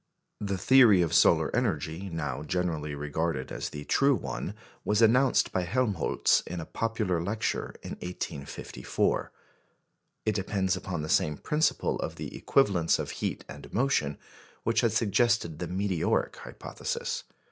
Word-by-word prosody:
The 100 -2 -2
theory 115 -5 +6
of 85 -1 -2
solar 80 0 +4
energy 95 - -1
now 75 -6 -3
generally 80 -3 -2
regarded 75 -1 -2
as - - -4
the 75 0 -7
true 140 0 +3
one 65 - -4 0.3
was 105 0 +1
enounced 125 +4 +4
by 95 - 0
Helmholtz 100 - +1
in 90 +1 -4
a 80 - -5
popular 110 -6 -1
lecture 105 +5 -2
in - - -7
1854. 70 -8 -3 0.9
It 110 - +2
depends 95 -1 0
upon 90 -4 -4
the - - -4
same 75 -1 +2
principle 155 +1 0
of - - -4
the - - -7
equivalence 95 -11 +2
of - - -4
heat - - -3
and - - -10
motion 110 - +1 0.5
which 115 - +2
had 115 -3 +2
suggested 115 -5 +1
the 90 - -3
meteoric 95 -1 0
hypothesis. - - -4
90 Hz, 140 wpm, -28 LUFS, 80-110 Hz, 0.9 s, theory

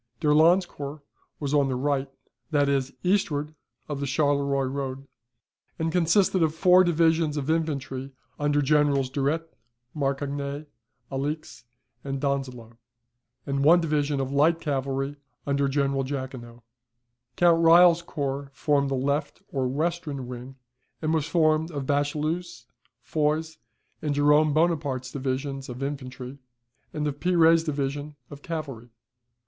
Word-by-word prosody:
D'Erlon's 165 +4 +4
corps 145 -2 -8 0.4
was 145 -1 -3
on 145 -2 +3
the 130 - -1
right, 140 +1 -1 0.4
that 145 -1 +2
is, 135 -1 0
eastward 155 -6 0 0.3
of 145 -2 -4
the 140 - -2
Charleroi 140 -1 +1
road, 135 0 -4 0.7
and 160 0 -1
consisted 180 +2 +3
of 160 -1 +2
four 180 +2 +6
divisions 165 -2 +2
of 145 +2 -1
infantry 140 -4 -2 0.3
under 145 0 +1
Generals 140 -2 +2
Durette, 150 +4 -1 0.4
Marcognet, 140 +1 -2 0.5
Alix, 140 -1 -4 0.4
and 135 -1 -3
Donzelot, 130 -5 -3 0.7
and 140 -1 -1
of - - +1
one 170 +4 +7
division 150 -3 0
of 135 0 -2
light 155 +4 +3
cavalry 135 -2 -2 0.3
under 140 0 +1
General 135 -1 0
Jaquinot. 130 -3 -6 0.7
Count 170 0 +4
Reille's 170 +1 +7
corps 140 -4 -4
formed 140 -1 +1
the 135 - 0
left 140 +3 -2
or 130 -2 -1
western 150 -1 -2
wing, 125 +1 -8 0.4
and 155 0 -1
was 155 -2 0
formed 160 -1 +2
of 145 -5 -4
Bachelu's, 150 0 -2 0.4
Foy's, 155 +1 -1 0.4
and 150 -2 -1
Jerome 150 +1 +4
Bonaparte's 145 -5 0
divisions 135 0 -3
of 125 +2 -6
infantry, 135 -1 -6 0.5
and 150 -1 -3
of 145 -1 -3
Pire's 165 -2 +4
division 145 -1 -3 0.2
of 145 0 -10
cavalry. 140 -8 -6
145 Hz, 130 wpm, -26 LUFS, 135-155 Hz, 0.7 s, one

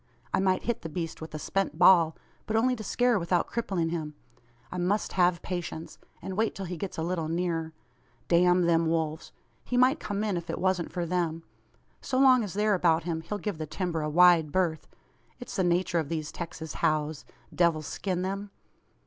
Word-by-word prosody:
"I - - +3
might 190 -1 +1
hit 235 -1 -2
the 165 - -6
beast 165 0 -5
with 160 -1 -7
a - - -2
spent 195 +2 -2
ball, 170 -2 +6 0.3
but 220 - -1
only 250 +3 +3
to 220 - -7
scare 245 +1 +2
without 170 0 +1
crippling 190 -8 -2
him. 155 -3 -4 0.6
I 180 - -4
must 195 +4 0
have 175 -1 +2
patience, 175 -3 -5 0.2
and 190 - -5
wait 220 +2 0
till 195 - -5
he 180 0 -5
gets 185 +3 -6
a 160 - -1
little 170 -2 -2
nearer. 165 -1 -1 0.6
Damn 180 +1 +4
them 165 -1 +3
wolves! 160 -1 -2 0.3
He 245 - -2
might 260 +5 +4
come 205 0 -3
in, 205 -4 0
if 170 - -7
it - - -2
wasn't 185 -2 0
for 175 -2 -2
them. 165 -2 -1 0.6
So 260 - -2
long 260 -2 +6
as 195 -3 -6
they're 210 0 +2
about 170 -3 +3
him, 165 -1 -3
he'll 205 +6 -4
give 205 -5 -4
the 155 - -4
timber 170 0 -2
a 150 - -2
wide 170 -1 +5
berth. 170 -2 0 0.5
It's 245 - -8
the 190 - +1
nature 175 0 +1
of 155 -3 -3
these 155 -3 -3
Texas 165 -2 -6
howes 155 -2 0 0.3
devil 170 -3 +2
skin 180 +3 -3
them! 195 +2 -3
175 Hz, 200 wpm, -28 LUFS, 165-195 Hz, 0.6 s, ball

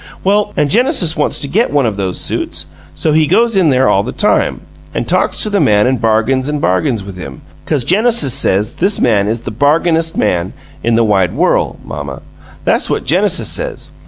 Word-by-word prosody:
Well, 205 +2 +1
an' 145 - +1
Genesis 195 - +2
wants 150 - 0
to 140 - -1
get 210 - 0
one 145 -3 +1
of 110 -3 -1
those 95 -2 -2
suits, - - -3 0.3
so 155 - -1
he 155 0 +2
goes 230 +4 +2
in 185 -5 +3
there 130 -1 +2
all 95 - +3
the 120 +5 -5
time, 210 - 0 0.3
an' - - -2
talks - - 0
to 215 - 0
the 200 - +1
man 105 - +3
an' 130 +1 +1
bargains 115 +5 0
an' 150 - -1
bargains 110 0 0
with 95 -1 -10
him, 70 -7 -9 0.2
'cause 145 -5 0
Genesis 205 - +2
says 105 +3 +1
this 195 +3 +1
man 105 -4 +2
is 115 +2 -2
the 120 - -6
bargainest 160 +6 +1
man 90 -3 -1 0.3
in 115 0 +1
the 115 - +3
wide 95 -5 +1
worl', - - 0
mamma! 70 -2 -7 0.4
That's - - +1
what - - -2
Genesis 185 +8 +2
says. - - -3
135 Hz, 200 wpm, -14 LUFS, 105-175 Hz, 0.4 s, in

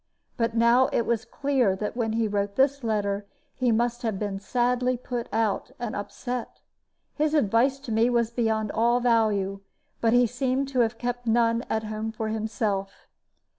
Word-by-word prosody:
But 230 -2 -1
now 235 +3 +5
it - - +1
was 225 -2 0
clear 265 -8 +1
that 210 +3 -4
when 225 -3 -1
he 225 0 +1
wrote 200 -1 -2
this 275 0 +2
letter 205 -2 -1 0.3
he 250 -2 +1
must 240 +2 0
have 220 -4 -1
been 200 -1 -3
sadly 250 +3 0
put 245 -1 -5
out 220 -1 0
and 240 -3 -4
upset. 245 +4 -5 0.5
His 305 +1 0
advice 260 +1 +3
to 255 - -7
me 225 +2 +3
was 235 -2 +1
beyond 220 -3 0
all 235 +2 +2
value; 215 -5 +1 0.4
but 230 0 +3
he 245 0 +5
seemed 255 +3 -1
to 260 -2 -1
have 225 -1 +2
kept 245 0 -4
none 230 +1 +2
at 220 0 0
home 215 +1 -4
for 220 0 -4
himself. 215 -3 -2
230 Hz, 170 wpm, -26 LUFS, 215-245 Hz, 0.5 s, now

